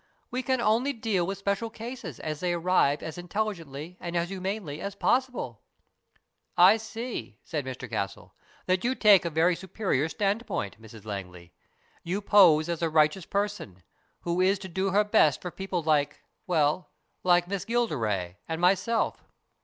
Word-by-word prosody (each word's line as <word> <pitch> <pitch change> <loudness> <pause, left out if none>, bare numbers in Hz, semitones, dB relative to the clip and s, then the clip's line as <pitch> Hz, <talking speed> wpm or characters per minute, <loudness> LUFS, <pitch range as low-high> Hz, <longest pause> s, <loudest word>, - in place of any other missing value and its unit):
We 255 - -1
can 260 -1 0
only 240 +5 +2
deal 215 -7 -1
with 195 0 -3
special 200 +3 -1
cases 225 - -7
as 155 -1 -4
they 180 0 0
arrive 170 -4 +2
as 160 +2 -6
intelligently 175 -5 -4
and 175 0 -5
as 170 0 0
humanely 190 -5 -4
as 200 0 -5
possible." 245 - 0 0.5
" - - -43
I 220 - +3
see," 225 - -6
said 150 -5 -3
Mr 130 -1 -6
Castle, 105 -4 -4 0.2
" - - -29
that 185 0 +1
you 255 +2 +1
take 205 -7 +6
a - - +1
very 165 +3 +3
superior 185 -6 -1
standpoint, 195 - -2
Mrs 110 -1 -13
Langley. 90 -4 -7 0.5
You 180 +4 -2
pose 180 -7 +6
as 170 -1 -3
a 165 - +1
righteous 155 +3 +2
person, 200 - -3 0.4
who 175 +1 0
is 190 +2 +3
to - - -4
do 190 +2 -1
her 205 +2 +4
best 210 -9 +3
for 180 - -6
people 190 -2 -3
like 150 -2 +1 0.2
well, 160 0 +1 0.3
like 175 -1 +3
Miss 195 0 -3
Gilderay 110 - -1
and 160 - -2
myself." 195 +6 +1
180 Hz, 165 wpm, -28 LUFS, 150-205 Hz, 0.5 s, take